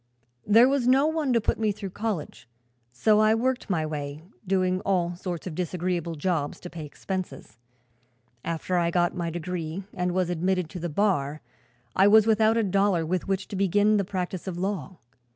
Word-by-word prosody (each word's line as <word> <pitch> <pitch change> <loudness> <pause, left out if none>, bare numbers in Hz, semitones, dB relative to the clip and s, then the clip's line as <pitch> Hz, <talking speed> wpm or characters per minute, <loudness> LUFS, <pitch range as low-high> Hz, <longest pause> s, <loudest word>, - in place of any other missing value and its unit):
"There 225 +4 +7
was 270 -2 +1
no 265 +3 +5
one 315 -3 0
to 235 - +4
put 225 - -1
me 215 -1 +2
through 200 -2 -6
college, 195 - -4 0.4
so 210 - +3
I 215 +1 +4
worked 255 +1 -1
my 165 -5 0
way 150 0 -5 0.2
doing 185 -1 +1
all 175 -3 0
sorts 175 -1 -5
of 180 - -5
disagreeable 175 -1 -2
jobs 155 -2 -1
to 180 - -8
pay 160 -3 -7
expenses. 180 - -6 0.8
After 170 +2 -2
I 170 -1 +2
got 175 0 +1
my 170 -1 -2
degree 170 +1 -4
and 180 0 -1
was 180 -1 0
admitted 180 0 0
to 180 - -6
the 175 +1 -3
bar 155 -5 0 0.5
I 195 - +5
was 215 +1 +7
without 220 0 +3
a 230 - +2
dollar 195 -3 +2
with 180 +3 -2
which 195 0 -1
to - - -5
begin 205 +2 +3
the 200 - +1
practice 185 -1 -4
of 180 -2 -4
law. 190 -2 -3
185 Hz, 185 wpm, -26 LUFS, 170-205 Hz, 0.8 s, There